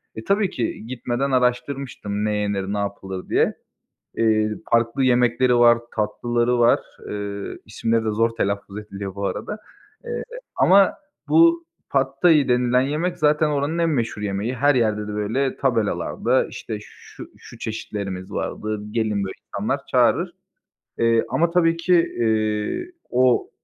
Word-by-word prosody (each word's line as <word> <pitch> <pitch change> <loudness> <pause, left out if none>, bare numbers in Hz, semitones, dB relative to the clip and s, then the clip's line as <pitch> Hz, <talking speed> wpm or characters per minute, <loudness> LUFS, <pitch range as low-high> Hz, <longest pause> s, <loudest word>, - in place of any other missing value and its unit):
E, 110 - -7
tabii 200 - +1
ki 115 -1 -4
gitmeden 130 +2 -2
araştırmıştım 125 -4 -1
ne 105 0 0
yenir, 100 -1 -1
ne - - -1
yapılır 95 -2 -5
diye. - - +2 0.6
Eee, 110 -1 +2 0.2
farklı 115 +3 +2
yemekleri 125 0 +3
var, 120 -1 +6 0.2
tatlıları 120 +3 0
var. 120 0 +5 0.3
Iıı, 100 -1 -5
İsimleri 115 +2 -1
de - - +1
zor 115 +2 +2
telaffuz 100 0 -2
ediliyor 100 -2 -7
bu 100 0 -3
arada 210 - -4 1.0
ama 195 +10 +5 0.4
bu 335 0 +5 0.2
Pad 135 -1 +2
Thai 160 -6 +5
denilen 125 0 +3
yemek 155 +6 -1
zaten 150 0 +3
oranın 145 +3 -1
en 165 -1 +2
meşhur 115 -7 -1
yemeği. 105 +5 -2
Her 145 +3 +3
yerde 110 -3 +1
de 105 - -5
böyle 115 +6 -1
tabelalarda 115 -6 +1
işte - - -6
şu - - -13
şu - - -13
çeşitlerimiz 100 -4 -5
vardı, 105 -1 -3
gelir 110 -1 0
böyle 100 -1 -2 0.2
insanlar - - -1
çağırır. - - +2 0.6
Eee 115 0 +3
ama 165 +7 +1
tabii 165 -1 +3
ki, 175 +2 +1
eee, 110 - 0 0.2
o, 125 0 +2
120 Hz, 140 wpm, -22 LUFS, 105-140 Hz, 1.0 s, var